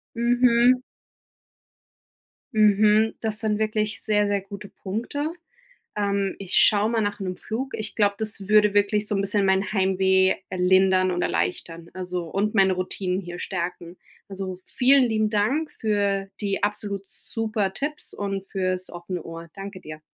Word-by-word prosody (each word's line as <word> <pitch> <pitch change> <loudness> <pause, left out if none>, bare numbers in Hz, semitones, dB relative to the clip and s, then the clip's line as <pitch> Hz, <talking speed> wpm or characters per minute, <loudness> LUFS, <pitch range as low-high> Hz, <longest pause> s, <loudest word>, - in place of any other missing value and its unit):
Mhm. 240 +1 +4 1.7
Mhm. 215 +1 +4
Das 220 -2 -2
sind 215 -1 0
wirklich 215 0 -1
sehr, 210 -1 +2
sehr 205 -1 0
gute 200 +1 -10
Punkte. 265 - -4 0.6
Ähm, 200 -1 0
ich 195 -1 -4
schaue 210 0 +5
mal 230 -1 +1
nach 205 0 -2
'nem 185 -2 -3
Flug. 260 +5 -5
Ich 215 -1 -4
glaube, 205 -1 +2
das 215 -3 -5
würde 210 -1 +5
wirklich 205 +1 +2
so 210 - -1
'n 195 - +1
bisschen 200 0 +1
mein 190 +2 +1
Heimweh, 190 -1 +3 0.2
äh, 185 - -5
lindern 185 0 +4
und 175 0 -1
erleichtern. 165 - -2
Also 180 -1 -4
und 210 +4 -1
meine 190 -2 +5
Routinen 185 0 -2
hier 175 -2 -7
stärken. 175 -1 -5 0.3
Also, 190 -2 -5
vielen 265 +1 +4
lieben 220 -3 +1
Dank 230 +10 0
für 200 -2 0
die 200 -2 -2
absolut 205 -1 -2
super 215 -1 -3
Tipps 300 +5 -3
und 195 -1 -4
für's 185 -1 -2
offene 175 0 -6
Ohr. 165 0 -9
Danke 195 -1 -8
dir. 155 0 -9
200 Hz, 150 wpm, -24 LUFS, 190-215 Hz, 1.7 s, schaue